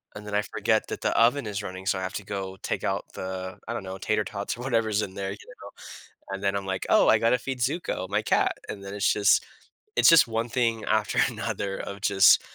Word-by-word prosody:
and 105 0 -9
then 105 - -3
I 105 - +3
forget 110 0 0
that - - -5
the - - 0
oven 120 +3 +4
is 100 0 -3
running, 95 0 -7
so, 95 -1 +1
I - - -5
have 95 - -4
to 100 - -5
go 95 -2 -5
take - - -2
out - - -1
the, 95 0 -5
I 120 - -3
don't 110 - -4
know, 95 0 -6
tater 105 0 0
tots 100 +2 -4
or - - -8
whatever's 110 -5 +1
in 95 - -6
there, 95 -1 -3
you 100 - -7
know? - - -12 0.7
And 100 - -9
then 100 0 +1
I'm, 100 - -5
like, 95 0 -3
"Oh, - - +5
I 110 - +5
gotta 115 +2 +3
feed 130 0 -5
Zuko", 125 - -2
my 105 +1 +1
cat, - - +1
and 100 -1 -6
then 100 +1 -7
it's 100 - +2
just 105 -1 +4 0.5
it's - - +7
just 165 -6 +7
one 115 +1 -2
thing 115 -2 0
after 110 +3 0
another 110 -4 -3
of 100 0 -7
just 100 -1 +6
105 Hz, 245 wpm, -26 LUFS, 95-115 Hz, 0.7 s, it's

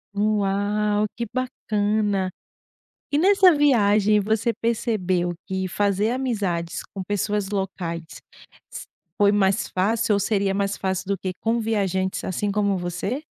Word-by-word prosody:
Uau, 205 0 +1
que 235 - -3
bacana. 210 -6 -1 0.8
E 285 - +2
nessa 380 +1 +6
viagem 215 -7 +4
você 220 +3 +1
percebeu 190 -7 -1
que 190 0 -2
fazer 205 +3 +1
amizades 200 -10 -2
com 195 - -5
pessoas 205 0 -1
locais 185 -4 -3 0.7
s - - -7 0.3
foi 205 0 +5
mais 200 0 +2
fácil 215 +4 +1
ou 200 - +2
seria 200 -1 +1
mais 200 0 -1
fácil 190 0 -2
do 200 0 0
que 185 0 -3
com 230 +1 +1
viajantes 190 -4 -1
assim 200 +2 -2
como 200 -1 +1
você? 180 - -3
205 Hz, 130 wpm, -23 LUFS, 190-220 Hz, 0.8 s, nessa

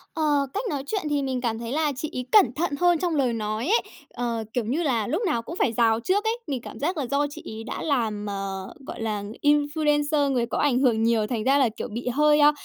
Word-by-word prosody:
Ờ, 295 -3 +2
cách 410 - -2
nói 280 -3 -2
chuyện 410 -3 -1
thì 290 -1 +1
mình 260 -2 -2
cảm 225 -2 -1
thấy 235 +1 -5
là 300 0 +1
chị 295 +4 -4
ấy 250 -1 -3
cẩn 400 - +6
thận 315 -2 -1
hơn 350 -2 +4
trong 345 -2 0
lời 260 -5 +2
nói 215 +3 -2
ấy, 450 +4 +4 0.3
ờ, 235 -2 -2
kiểu 245 - 0
như 280 +10 0
là, 235 -8 0
lúc 330 +9 -1
nào 235 -11 +1
cũng 320 +9 -7
phải 250 - +1
rào 225 -1 +3
trước 380 - +1
ấy. 450 +1 0
Mình 265 -4 -2
cảm - - -9
giác 340 +5 -1
là 285 - -1
do 285 +1 +2
chị 290 - -10
ấy 220 +1 -7
đã - - -5
làm, 225 -8 -1
ờ, 195 -1 -4
gọi - - -6
là, 215 -2 -2
ng 205 +1 -7
influencer, 295 0 +2
người 240 -2 +1
có 230 - -3
ảnh 275 -4 +2
hưởng 235 -4 +3
nhiều, 225 -2 +2
thành 225 -2 -2
ra 270 +3 +4
là, 265 -4 +4
kiểu, 220 - -6
bị 240 +3 -5
hơi, 295 +4 +4
a, 295 0 +7
265 Hz, 260 wpm, -25 LUFS, 230-300 Hz, 0.3 s, a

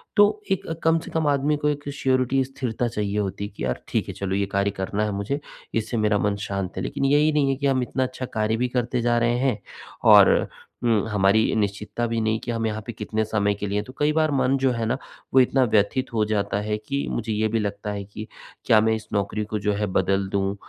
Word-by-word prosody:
तो 205 - +8 0.3
एक 190 - 0 0.2
कम 165 0 +4
से - - -10
कम 160 -2 0
आदमी 145 +1 +2
को 150 0 0
एक 145 -1 -3
श्योरिटी 130 0 +1
स्थिरता 125 -3 -3
चाहिए 105 -2 -2
होती 100 0 -3
कि - - -8
यार 60 - -2
ठीक - - -1
है - - -5
चलो 95 -1 -3
ये 100 0 +1
कार्य 100 0 +2
करना 100 +2 -1
है 105 - -1
मुझे, 100 +9 -2 0.3
इससे 115 +1 -1
मेरा 105 -1 +2
मन 100 0 +1
शांत 100 -2 -4
है। - - -2
लेकिन 135 - -2
यही 150 +3 +4
नहीं 140 -2 +2
है 135 - +1
कि 140 +1 -4
हम 130 -2 +2
इतना 130 +2 -1
अच्छा 130 0 -4
कार्य 110 +1 0
भी 125 +2 +1
करते 125 0 -1
जा 120 0 +2
रहे 120 +1 +2
हैं, 130 -6 +1 0.4
और - - +7 0.4
हुँ 115 -3 +2
हमारी 105 +1 +3
निश्चितता 105 +3 -1
भी 115 0 -1
नहीं 110 0 +1
कि 120 - -3
हम 115 -1 -1
यहाँ 110 0 -3
पे 120 - -4
कितने 110 +1 -2
समय 105 -1 +1
के 105 0 -4
लिए 100 +1 -1
हैं। 105 - 0
तो 130 - -11
कई 150 +1 +2
बार 155 -1 +2
मन 135 0 +2
जो 130 -1 +2
है 115 -1 -2
ना 115 - 0 0.4
वो 130 - +7
इतना 130 +1 +4
व्यथित 110 +3 +2
हो 110 -2 +2
जाता 100 -1 -1
है 105 0 -2
कि 140 +6 -3
मुझे 110 -1 -2
ये 110 +1 +1
भी 115 +1 0
लगता 105 0 -3
है 100 -1 -4
कि 105 +2 -8 0.4
क्या 110 - +6
मैं 110 0 +2
इस 110 -1 -8
नौकरी 100 +1 -1
को 105 0 -3
जो 105 +1 0
है 105 +1 -1
बदल 95 +1 +1
दूँ? 100 0 0
110 Hz, 245 wpm, -24 LUFS, 105-130 Hz, 0.4 s, तो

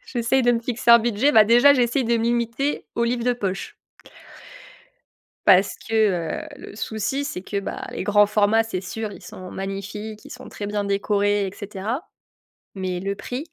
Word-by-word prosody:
J'essaye 250 - +1
de 245 0 +4
me 230 - 0
fixer 235 0 0
un 235 - +10
budget. 235 +5 +1
Bah, 220 -4 +7
déjà, 240 +6 +6
j'essaye 250 0 +1
de 235 0 +2
me 225 - -1
limiter 235 +4 -1
aux 235 - +1
livres 235 0 -1
de 250 - +3
poche 195 -5 -4 1.7
parce 195 0 +5
que, 225 - -3 0.5
heu, - - -11
le - - -11
souci, 220 +6 -2
c'est 180 - -5
que, 200 +1 -3
bah, 195 - -6
les - - -4
grands 205 +1 +5
formats, 210 +1 +3
c'est 225 -5 -4
sûr, 215 +3 -5
ils - - -12
sont 185 -1 -10
magnifiques, 200 +2 -6
ils - - -13
sont 255 +1 -10
très 205 - -6
bien 205 0 -2
décorés 200 0 +1
et 190 - -6
cetera, 210 - -4 0.7
mais 185 -2 -3
le 195 +2 -3
prix. 250 +8 -6
220 Hz, 185 wpm, -23 LUFS, 200-240 Hz, 1.7 s, un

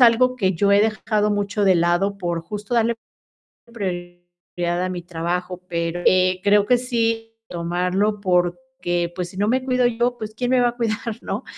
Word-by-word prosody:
algo, 250 +1 +5
que 190 -6 +1
yo 200 +3 +1
he 200 - +6
dejado 215 -1 +1
mucho 205 0 -1
de 190 -1 +5
lado, 175 +4 +1
por 175 -3 -2
justo, 210 +4 -5
darle 235 0 +2 0.8
prioridad 175 -2 -4
a - - -2
mi 180 -1 -4
trabajo. 175 +1 -3
Pero, 170 0 -2
eh, 185 0 +4
creo 205 0 +4
que 250 +3 +4
sí, 230 -2 -1 0.2
tomarlo, 180 +5 -1
porque, 175 -1 -1
pues, 180 -1 -3
si 185 - -13
no 205 +1 +1
me 255 +3 +1
cuido 255 -1 +1
yo, 240 +1 +1
pues, 215 0 -6
¿quién 245 +2 -2
me 255 - +4
va 245 -1 +4
a 240 - -7
cuidar, 225 -3 -1 0.2
¿no? - - -4
200 Hz, 180 wpm, -22 LUFS, 175-230 Hz, 0.8 s, he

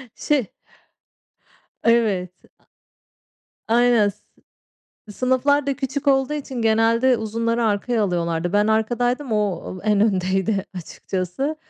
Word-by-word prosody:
şey 280 -8 0 1.4
Evet, 215 -6 +2 1.4
a 225 - 0
aynen, 240 -4 +4
s 205 +1 -13 0.9
sınıflar 260 +5 +1
da 275 - 0
küçük 280 +1 -4
olduğu 270 +1 +2
için 265 -4 -5
genelde 230 +3 +3
uzunları 230 +2 -1
arkaya 215 +1 0
alıyorlardı. 170 -1 -1
Ben 205 +1 +3
arkadaydım, 245 +4 0
o 195 -3 -2
en 210 -2 +2
öndeydi 195 0 0
açıkçası. 185 - -4
225 Hz, 105 wpm, -22 LUFS, 200-255 Hz, 1.4 s, aynen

